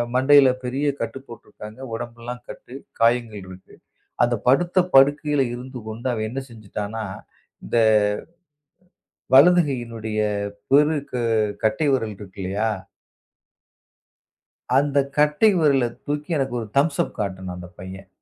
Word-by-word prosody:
மண்டையில 135 +1 +6 0.2
பெரிய 135 +4 -2 0.2
கட்டு 135 - -4
போட்டுருக்காங்க. 105 -1 -12 0.2
உடம்பெல்லாம் 120 +1 -7
கட்டு 125 - -10 0.3
காயங்கள் 115 -3 +1
இருக்கு. 90 0 -14 0.5
அந்தப் 120 -2 -1
படுத்த 175 +8 +3 0.2
படுக்கையில 145 +1 +4
இருந்து 125 +1 -8
கொண்டு 115 +4 -5
அவன் 110 -2 -2
என்ன 135 +4 -4
செஞ்சுட்டானா, 110 0 -6 0.6
இந்த - - -1 1.6
வலது 175 +6 +7
கையினுடைய 115 -4 -4 0.5
பெருக் 150 0 +3
க - - -11 0.5
கட்டை 135 +8 +1
விரல் 115 -5 -1
இருக்குல்லையா? 100 +2 -3 2.1
அந்த 145 0 +1 0.2
கட்டை 150 +8 +4
விரல 140 -5 +3 0.2
தூக்கி, 150 +2 -3
எனக்கு 135 -2 -2
ஒரு 110 - -8
தம்ஸ் 145 +1 +1
அப் - - -13
காட்டினான் 95 -2 -4
அந்த 90 0 -9
பையன். 95 +1 -9
125 Hz, 115 wpm, -22 LUFS, 110-140 Hz, 2.1 s, வலது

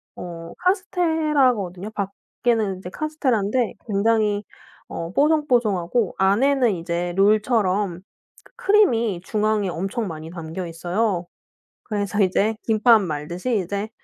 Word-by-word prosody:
어 170 -1 -8
카스테라거든요. 305 - +1 0.5
밖에는 215 -6 +1
카스테라인데 255 -6 0
굉장히 210 0 +1 0.4
어 165 0 -5
뽀송뽀송하고 240 - +2
안에는 235 +4 +3
이제 175 +1 -3
롤처럼 205 -3 +2 0.6
크림이 245 - +3
중앙에 210 -2 0
엄청 195 +6 -3
많이 160 -2 -7
담겨 170 +1 -6
있어요. 175 +3 -1 0.6
그래서 205 -1 -1
이제 200 +4 +1
김밥 225 +1 +5
말듯이 175 +7 -2
이제 200 +3 -3
210 Hz, 265 characters per minute, -22 LUFS, 180-245 Hz, 0.6 s, 김밥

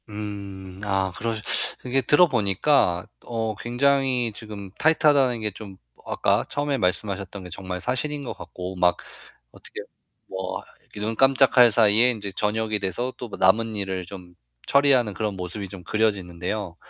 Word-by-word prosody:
음. 100 -3 -7
아, 95 -2 0
그러시 115 0 -3 0.4
이게 130 +2 +1
들어 145 +8 +5
보니까 100 - +2 0.2
어 115 -2 -2
굉장히 125 0 +1
지금 105 -4 -8
타이트하다는 145 -6 +3
게 105 -1 -1
좀 100 -1 -11 0.3
어 - - -4
아까 - - +2
처음에 145 -1 -1
말씀하셨던 95 +1 -2
게 90 - -9
정말 90 +1 -5
사실인 140 +6 -2
것 125 - -5
같고, 90 +1 -8
막 90 -1 +3 0.5
어떻게 - - -9 0.5
뭐 95 0 -4 0.3
이 - - -6
눈 110 +2 -2
깜짝할 135 -1 +5
사이에 110 +2 +5
인제 105 -4 -5
저녁이 110 +2 -1
돼서 120 +7 -2
또 120 - -7
그 - - -6
남은 110 +4 +3
일을 95 -3 -2
좀 90 -2 -11 0.3
처리하는 135 -6 +4
그런 105 -1 -2
모습이 95 +2 -6
좀 90 -1 -10
그려지는데요. 95 -2 -2
105 Hz, 315 characters per minute, -24 LUFS, 95-125 Hz, 0.5 s, 들어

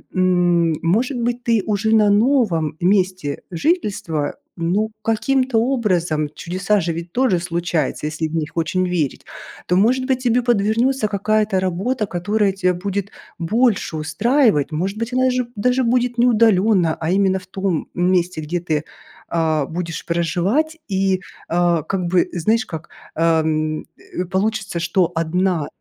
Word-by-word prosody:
м, 175 -2 +3
может 230 - +1
быть 240 +1 -2
ты 230 -3 +2
уже 215 +1 0
на 210 -1 +4
новом 205 - +2
месте 185 -5 0
жительства, 175 - -1 0.2
ну, 190 +6 0
каким-то 255 +3 +1
образом, 180 - 0
чудеса 190 +6 -1
же 170 0 -2
ведь 170 +1 -7
тоже 245 -7 +2
случаются, 170 -4 -2
если 160 +1 -2
в 155 - -6
них 155 -1 -2
очень 170 +3 0
верить, 165 -6 -2 0.4
то 180 - +2
может 245 +7 +3
быть 260 -1 0
тебе 245 0 +2
подвернётся 230 +1 +1
какая-то 210 0 +1
работа, 195 +6 -1
которая 200 +3 0
тебя 185 -1 +1
будет 200 +2 -3 0.3
больше 210 -1 +1
устраивать. 205 - +2
Может 185 +7 -2
быть 230 +2 -3
она 255 0 +3
же 250 -1 -1
даже 250 +5 +1
будет 245 0 +1
не 240 - +4
удалённо, 210 -7 +3
а 160 +1 -1
именно 190 0 +2
в 185 - -16
том 190 -3 -2
месте, 180 -2 +1
где 170 +3 -3
ты, 155 -3 -1 0.5
а, 160 -3 +1
будешь 165 0 -5
проживать, 180 - 0
и, 190 -1 +1 0.3
а, 170 -1 +2
как 195 +3 -2
бы 180 +1 +2
знаешь 220 +6 +1
как, 160 -1 -8 0.3
э, - - -3 0.2
м, 155 0 -1 0.4
э, - - -2
получится, 195 0 -1
что 170 +1 +1
1, 165 0 0
185 Hz, 150 wpm, -20 LUFS, 170-225 Hz, 0.5 s, на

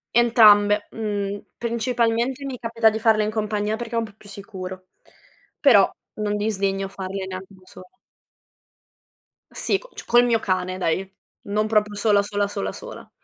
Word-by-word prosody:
Entrambe, 210 -3 +5
mhmm, 205 -2 -3 0.2
principalmente 235 +2 0
mi 260 -2 -5
capita 230 -1 +2
di 220 - -3
farle 220 -1 +3
in 210 - -1
compagnia 210 0 -1
perché 235 0 -7
è - - 0
un 230 - -2
po' 215 - -14
più 205 - -17
sicuro, 185 -2 -8 0.7
però 225 -9 +6 0.3
non 210 -1 -2
disdegno 195 -2 -1
farle 190 0 -5
neanche 185 +1 -8
da 185 - -19
sola. 185 0 -14 1.6
Sì, 390 - 0
c - - -15
cio - - -8
col 240 0 +5
mio 235 -1 +3
cane 185 -2 -1
dai, 190 +2 -1 0.4
non 210 +1 0
proprio 210 -1 +1
sola, 205 -1 +3
sola, 205 0 -1
sola, 200 0 -4
sola. - - -10
210 Hz, 160 wpm, -23 LUFS, 195-230 Hz, 1.6 s, però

